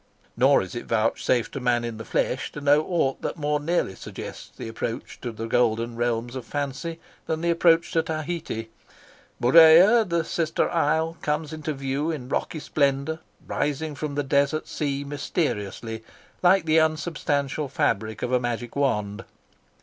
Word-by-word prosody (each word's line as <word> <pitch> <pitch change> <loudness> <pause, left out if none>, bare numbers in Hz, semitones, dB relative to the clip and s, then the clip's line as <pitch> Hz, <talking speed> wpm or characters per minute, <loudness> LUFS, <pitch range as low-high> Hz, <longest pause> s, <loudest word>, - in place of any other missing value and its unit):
Nor 130 +1 +4
is 95 - -9
it 120 - -6
vouchsafed 115 +1 +1
to - - -5
man 120 -2 +1
in 115 -2 -4
the 110 - -6
flesh - - -1
to - - -6
know 145 +1 +4
aught 160 -7 0
that - - -3
more 150 -1 0
nearly 155 - 0
suggests - - -8
the - - -6
approach 115 +2 -5
to 120 - -4
the 110 0 -6
golden 115 0 +1
realms 120 +1 -1
of 130 - -4
fancy 145 +5 -4 0.3
than 160 0 -1
the 170 0 +2
approach 170 0 +3
to 165 - +3
Tahiti. 155 -8 -4 0.7
Murea, 165 - +7
the 170 -4 0
sister 160 -1 0
isle, 160 0 +1
comes 150 +1 -2
into 155 0 -4
view 135 +3 -2
in 135 -6 -4
rocky 160 - -2
splendour, 140 +2 0 0.3
rising 150 +1 -2
from 145 0 -4
the 145 - 0
desert 140 +3 +1
sea 140 -2 -2
mysteriously, 115 - -3 0.4
like 180 -1 +4
the 160 0 +4
unsubstantial 155 -3 0
fabric 110 -7 -1
of 125 - -2
a 125 - +3
magic 120 -1 -4
wand. 105 -8 0
145 Hz, 160 wpm, -25 LUFS, 120-160 Hz, 0.7 s, Murea